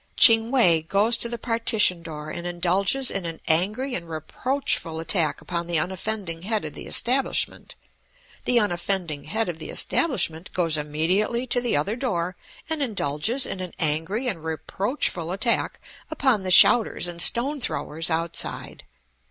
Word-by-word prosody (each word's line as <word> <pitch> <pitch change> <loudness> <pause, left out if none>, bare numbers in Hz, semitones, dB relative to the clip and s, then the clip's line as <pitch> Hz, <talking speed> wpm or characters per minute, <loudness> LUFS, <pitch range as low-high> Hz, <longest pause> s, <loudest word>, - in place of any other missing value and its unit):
Ching 225 -1 +7
We 180 -12 +4
goes 200 +8 +2
to 235 - 0
the 235 - -4
partition 230 -6 +2
door 155 -2 -7
and 175 +2 -5
indulges 190 +9 +1
in 195 - -2
an 165 -1 -7
angry 210 +11 0
and 170 -5 -4
reproachful 165 - -2
attack 165 -2 0
upon 170 -1 -4
the 170 -1 0
unoffending 185 0 -3
head 215 0 -2
of 150 - -7
the - - -9
establishment. 260 +3 0 0.7
The 245 -1 +4
unoffending 175 -6 -2
head 225 -1 -2
of 170 -2 -5
the - - -7
establishment 190 - 0
goes 165 -3 +1
immediately 170 +11 -1
to 245 0 +2
the 240 -10 0
other 175 +10 -1
door 180 -9 -2 0.3
and 320 -2 -1
indulges 220 - 0
in 195 - -4
an 180 -2 -6
angry 165 - -1
and 180 -9 -3
reproachful 175 - -3
attack 215 +5 -1 0.3
upon 265 -8 +1
the 185 - -4
shouters 210 +1 +6
and 170 -1 -3
stone 270 - +3
throwers 160 -7 -3
outside. 165 0 -3
185 Hz, 150 wpm, -24 LUFS, 165-235 Hz, 0.7 s, Ching